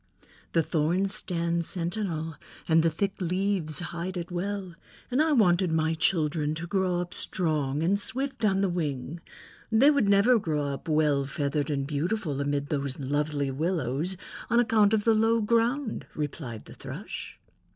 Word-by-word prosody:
"The 165 - +3
thorns 175 +6 +1
stand 170 -4 0
sentinel 170 -3 -2 0.3
and 160 0 +5
the 165 - +3
thick 195 +5 -1
leaves 180 -3 0 0.2
hide 180 +2 -4
it 175 0 -5
well, 190 0 -3 0.4
and 255 +4 +3
I 315 0 +3
wanted 185 - +4
my 160 0 +1
children 155 -2 +1
to 165 +2 -4
grow 185 0 0
up 175 0 -6
strong, 155 -4 0
and 195 +4 +2
swift 265 +2 -3
on 195 -2 +3
the 200 - +3
wing. 155 -3 -3 0.5
They 255 +7 +6
would 280 -9 +2
never 210 +5 +5
grow 150 -6 -1
up 135 - -8
well 150 -3 +3
feathered 140 +1 -1
and 140 -2 -1
beautiful 150 +1 -1
amid 145 0 -1
those 140 -2 -2
lovely 145 0 -1
willows 160 +2 -1 0.3
on 235 - +4
account 220 -2 +4
of 210 - 0
the 225 - +4
low 225 +1 +3
ground," 230 +3 0
replied 135 -6 -5
the - - -12
Thrush. - - -7
170 Hz, 160 wpm, -27 LUFS, 150-200 Hz, 0.5 s, They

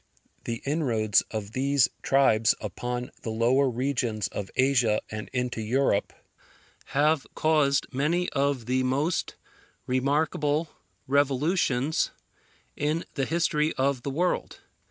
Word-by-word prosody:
The 115 -1 -4
inroads 120 -9 +2
of 110 -2 -5
these 135 +2 +2
tribes 125 -5 +3
upon 120 +4 -4
the - - -5
lower 120 +5 +2
regions 120 -4 -1
of 100 -2 -5
Asia 125 -5 +3
and 105 0 -6
into 125 -2 -2
Europe, 115 -2 +1 0.7
have 150 +1 +1
caused 150 -3 +2
many 165 +7 +1
of 140 -4 0
the 130 +2 +1
most 140 +7 0 0.5
remarkable 145 +4 0 0.4
revolutions 140 +1 +1 0.7
in 155 +3 -1
the 135 - -1
history 160 -1 +1
of 135 -1 0
the 140 - -4
world. 175 +6 -1
135 Hz, 115 wpm, -27 LUFS, 120-145 Hz, 0.7 s, tribes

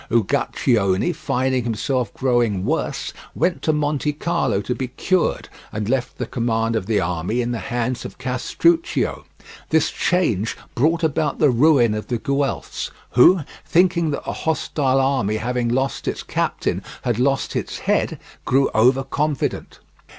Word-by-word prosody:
Uguccione, 110 - +1
finding 130 -4 0
himself 120 0 -1
growing 120 -7 +1
worse, - - -2 0.2
went 180 -1 0
to 155 - +2
Montecarlo 150 - 0
to 125 - -1
be 130 +1 -3
cured, 175 +8 0 0.2
and 105 -1 -3
left 130 +1 -1
the 125 - -2
command 115 -2 -1
of 105 -4 -2
the 110 -2 +2
army 90 +7 -1
in 120 0 -1
the 120 - -2
hands 120 +2 -2
of - - -8
Castruccio. 320 - 0 0.4
This 160 -1 +2
change 115 - 0 0.2
brought 165 +6 +1
about 150 -1 0
the 150 -3 +4
ruin 125 -3 +4
of 105 0 -4
the 120 - -1
Guelphs, 140 +3 -2 0.2
who, 170 +9 +6 0.2
thinking 170 -2 +2
that 145 - -3
the - - -3
hostile 145 -4 0
army 130 -6 +1
having 120 +1 -1
lost 130 +3 -1
its - - -2
captain - - -1 0.2
had 120 -2 0
lost 135 +1 +1
its - - -3
head, - - 0 0.2
grew 135 +1 +2
over 130 +5 +4
confident. 145 +1 -2
130 Hz, 145 wpm, -21 LUFS, 115-150 Hz, 0.4 s, who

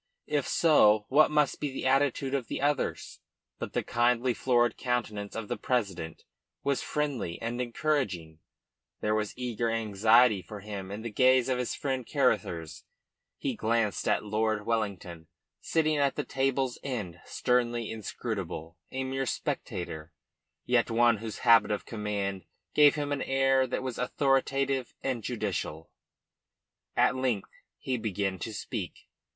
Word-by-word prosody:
If 145 -3 0
so, 110 -10 +5
what 150 +3 +6
must 150 -2 +2
be 145 -2 -2
the 130 - -5
attitude 135 0 +2
of 135 -4 -1
the - - -3
others? 145 0 -1 0.4
But - - -5
the - - 0
kindly, 120 +1 +2
florid 120 -2 +2
countenance 110 -5 -2
of 115 -2 -4
the - - -3
president 95 -10 -2 0.4
was 140 -1 +1
friendly 140 - -2
and 120 +2 -3
encouraging; 115 - -1 0.6
there 105 - +1
was 110 0 -2
eager 120 -2 -1
anxiety 110 0 +4
for 105 +4 -9
him 100 -2 -6
in 105 +3 -6
the 115 - -4
gaze 130 +3 +4
of 125 -1 +1
his 125 - -2
friend 130 -2 -2
Caruthers. 90 - 0 0.5
He - - -2
glanced 110 -2 0
at - - +1
Lord 110 0 0
Wellington 95 -7 -2 0.3
sitting 155 -2 +1
at 140 -1 +2
the - - -1
table's 135 -1 0
end 105 -11 -4
sternly 120 -2 0
inscrutable, 95 -7 -5
a 130 0 -2
mere 135 0 -2
spectator, 80 -7 -4 0.5
yet 125 -1 +2
one 115 0 +4
whose 110 0 -6
habit 115 -2 +7
of 105 -1 -2
command 100 -4 -3 0.3
gave 150 -1 +6
him 145 -1 -2
an 145 -1 -1
air 135 0 +2
that 130 - -3
was 130 -2 -4
authoritative 135 0 +1
and 130 -3 -1
judicial. 95 -8 -3 1.0
At - - +4
length 125 -6 -1 0.3
he 130 -1 -2
began 100 -4 -2
to 110 - -4
speak. 105 - -6
120 Hz, 145 wpm, -29 LUFS, 105-130 Hz, 1.0 s, habit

